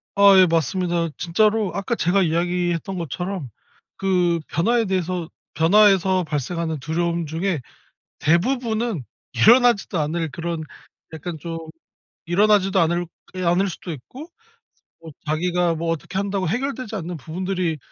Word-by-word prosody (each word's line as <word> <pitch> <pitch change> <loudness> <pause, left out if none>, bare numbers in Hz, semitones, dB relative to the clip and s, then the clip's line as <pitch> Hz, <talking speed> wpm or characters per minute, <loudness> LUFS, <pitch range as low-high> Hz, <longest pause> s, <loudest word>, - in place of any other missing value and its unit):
아 200 -1 +7
예. 185 - +8
맞습니다. 170 +1 0
진짜로 210 +3 +1
아까 200 +4 -1
제가 195 -1 +2
이야기했던 175 +2 0
것처럼 175 -2 -4 0.5
그 180 -3 +1
변화에 230 +8 +1
대해서 185 -3 -2 0.3
변화에서 190 +1 +4
발생하는 160 +1 -3
두려움 170 +3 -1
중에 160 0 -2 0.6
대부분은 220 - 0 0.3
일어나지도 230 - +4
않을 160 +1 -1
그런 165 +2 -4 0.5
약간 160 +1 -6
좀 165 +2 -5 0.7
일어나지도 195 +1 +3
않을 170 +1 +1 0.3
게 185 0 -4
않을 180 +3 +2
수도 175 0 -7
있고 255 - -10 0.7
뭐 160 -2 -11
자기가 170 +2 +1
뭐 165 +1 -2
어떻게 165 +3 -3
한다고 195 -2 -1
해결되지 255 - -3
않는 175 -2 -5
부분들이 175 +1 -2
175 Hz, 310 characters per minute, -22 LUFS, 165-195 Hz, 0.7 s, 예